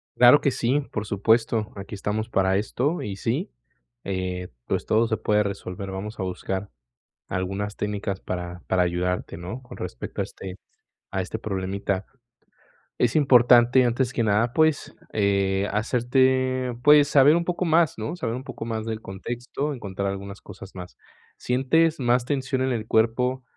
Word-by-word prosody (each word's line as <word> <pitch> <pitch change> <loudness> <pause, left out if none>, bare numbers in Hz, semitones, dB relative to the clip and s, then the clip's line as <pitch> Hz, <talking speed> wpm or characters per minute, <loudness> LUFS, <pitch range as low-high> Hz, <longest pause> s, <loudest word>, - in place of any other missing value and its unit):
Claro 125 +4 +7
que 140 - +3
sí, 130 +5 +1
por 110 0 -3
supuesto, 110 +2 +1
aquí 100 +1 -8
estamos 105 +2 -2
para 95 -3 +2
esto 135 - -1
y 100 -2 -5
sí, - - -2 0.5
eh, 90 -1 -3 0.2
pues, - - -2
todo 115 +1 +3
se 110 - 0
puede 105 0 +2
resolver, 95 -1 -5
vamos 105 +3 -6
a - - -1
buscar 95 +2 -4 0.6
algunas 95 +3 -3
técnicas 100 -1 -3
para 90 -1 -5
para 95 -1 +2
ayudarte, 90 +1 -1
¿no?, 95 +10 -7
con 125 - -11
respecto 85 -9 -6
a - - +1
este 95 -1 -9 0.5
a 95 - -2
este 100 +4 -4
problemita, 100 -1 -2 0.9
es 120 +2 +1
importante, 125 -2 +6
antes 120 +1 +1
que 120 - 0
nada, 110 +3 +2
pues, 155 +1 +2 0.2
eh, 100 -1 +1
hacerte, 130 +3 +1
pues, 145 -1 +7
saber 145 +2 +6
un 170 0 0
poco 180 +1 -1
más, 160 -4 +3
¿no?, 110 +11 -3
saber 115 -8 -3
un 130 - -6
poco 115 - -7
más 110 -1 -3
del 110 -1 -4
contexto, 120 +9 -4
encontrar 100 -4 -4
algunas 100 0 -6
cosas 95 -1 -11
más, 90 -1 -10 0.4
¿sientes 150 +6 +2
más 120 0 +2
tensión 135 -2 -1
en 130 - 0
el 110 -2 -3
cuerpo 125 +3 +1
110 Hz, 160 wpm, -25 LUFS, 95-130 Hz, 0.9 s, Claro